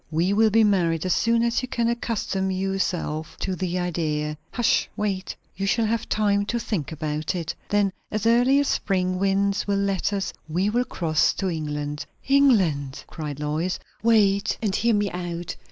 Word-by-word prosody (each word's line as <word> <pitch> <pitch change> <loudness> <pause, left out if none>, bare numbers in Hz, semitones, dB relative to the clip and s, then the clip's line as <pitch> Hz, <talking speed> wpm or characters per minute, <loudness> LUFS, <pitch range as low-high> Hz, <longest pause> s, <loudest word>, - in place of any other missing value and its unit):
We 170 +5 +1
will 220 +1 +4
be 225 +1 +4
married, 175 -5 +2
as 185 - +2
soon 230 0 +2
as 235 +1 +1
you 255 - -4
can 235 -2 0
accustom 225 -5 -1
your 190 +1 -1
self 160 -4 -2
to 190 - -2
the 180 0 -2
idea. 155 -4 -1 0.2
Hush! 240 -2 +2
wait. 200 -2 -2 0.2
You 195 +1 -2
shall 225 +3 +2
have 230 +1 -1
time 205 -1 +2
to 235 - 0
think 200 - -3
about 155 +1 -2
it. 165 -3 -3 0.2
Then, 205 -2 +2 0.2
as 215 0 -2
early 245 +4 +5
as 285 - +1
spring 185 -2 0
winds 195 +1 +1
will 200 -1 +1
let 200 -1 0
us, 195 -1 -2 0.2
we 185 +6 +1
will 245 +2 +1
cross 160 -8 +1
to 190 -2 -1
England." 150 -2 -4 0.2
"England?" 190 - +3
cried 150 -3 -6
Lois. 155 +5 -1 0.2
"Wait, 205 -3 +3
and 205 -4 -1
hear 235 -1 +2
me 205 -1 0
out. 175 -1 -4
195 Hz, 180 wpm, -24 LUFS, 165-215 Hz, 0.2 s, early